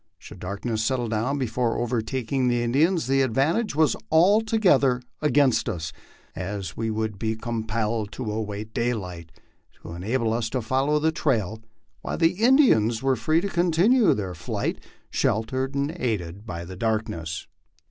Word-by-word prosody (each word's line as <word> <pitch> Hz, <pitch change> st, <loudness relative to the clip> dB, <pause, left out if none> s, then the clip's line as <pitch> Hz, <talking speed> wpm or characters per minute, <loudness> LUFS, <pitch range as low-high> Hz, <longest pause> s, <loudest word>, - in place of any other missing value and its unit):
Should -, -, -12 dB
darkness 110 Hz, +4 st, -3 dB
settle 120 Hz, 0 st, 0 dB
down 115 Hz, +6 st, 0 dB
before 125 Hz, -2 st, -1 dB
overtaking 125 Hz, +2 st, -1 dB
the 120 Hz, -1 st, +1 dB
In 120 Hz, 0 st, -1 dB
dians, 165 Hz, +3 st, +3 dB
the 135 Hz, +2 st, +2 dB
advantage 140 Hz, -, +1 dB
was 155 Hz, 0 st, +3 dB, 0.2 s
altogether 180 Hz, -, +4 dB, 0.2 s
against 140 Hz, -6 st, +3 dB
us, 80 Hz, -7 st, -4 dB, 0.4 s
as 95 Hz, -1 st, -5 dB
we 115 Hz, 0 st, -2 dB
would 110 Hz, -2 st, -2 dB
be 110 Hz, -1 st, -1 dB
compelled 110 Hz, -1 st, -2 dB
to 120 Hz, -5 st, -4 dB
await 105 Hz, 0 st, -4 dB
daylight 90 Hz, -9 st, -3 dB, 0.5 s
to 85 Hz, -, -8 dB
enable 110 Hz, +6 st, -1 dB
us 115 Hz, -1 st, -1 dB
to 130 Hz, +1 st, -2 dB
follow 135 Hz, +6 st, +1 dB
the 160 Hz, +2 st, +2 dB
trail, 110 Hz, -, -1 dB, 0.4 s
while -, -, -4 dB
the 165 Hz, 0 st, +4 dB
Indians 130 Hz, -, +4 dB
were 135 Hz, -1 st, +3 dB
free 155 Hz, +8 st, +1 dB
to 200 Hz, -, -2 dB
continue 180 Hz, +7 st, +3 dB
their 95 Hz, -4 st, -4 dB
flight, 80 Hz, -, -3 dB, 0.3 s
sheltered 130 Hz, +5 st, 0 dB
and 140 Hz, +2 st, 0 dB
aided 100 Hz, -4 st, -3 dB
by 85 Hz, -3 st, -5 dB
the 95 Hz, +2 st, -8 dB
darkness. 95 Hz, -7 st, -2 dB
115 Hz, 150 wpm, -25 LUFS, 110-140 Hz, 0.5 s, altogether